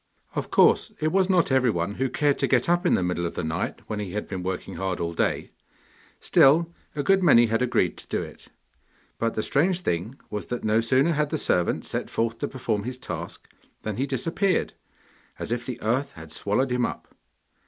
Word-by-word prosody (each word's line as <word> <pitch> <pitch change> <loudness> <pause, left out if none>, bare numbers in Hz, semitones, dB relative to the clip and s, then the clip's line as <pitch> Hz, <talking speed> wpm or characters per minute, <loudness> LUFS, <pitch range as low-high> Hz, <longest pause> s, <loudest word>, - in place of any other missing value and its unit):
Of - - -3
course - - +4
it 155 0 0
was 190 +1 +2
not 180 -6 +3
everyone 110 -9 +2
who 130 +4 -1
cared 145 +2 +1
to - - +2
get 125 -2 +2
up 175 +1 +2
in - - +4
the 95 - 0
middle 90 -1 -1
of - - -7
the - - -3
night, 80 0 -3
when 105 - -4
he 100 -4 -5
had 105 - -3
been 95 -2 -4
working 90 0 -4
hard 95 -2 -2
all 85 0 -2
day; - - -1 0.7
still, 165 +5 +4 0.2
a 145 - -1
good 195 +5 +4
many 130 -9 +6
had 115 +1 0
agreed 120 -8 +1
to - - -9
do - - -1
it. - - -11 0.7
But 115 0 0
the 110 - -1
strange 175 +5 +1
thing 105 - -2
was 105 - -4
that 120 - -4
no 110 +1 +3
sooner 130 +7 +3
had 150 -2 0
the 155 - -1
servant 90 - +1
set - - -3
forth 115 0 -1
to 145 - -1
perform 120 -6 -2
his 125 +4 -5
task - - -7 0.4
than 110 -2 -3
he 135 +3 0
disappeared, 165 - 0 0.6
as - - -5
if 120 0 -2
the 125 -2 -5
earth 130 +6 0
had 80 -1 -11
swallowed 105 +10 0
him 125 0 +1
up. - - -4
125 Hz, 210 wpm, -25 LUFS, 105-145 Hz, 0.7 s, many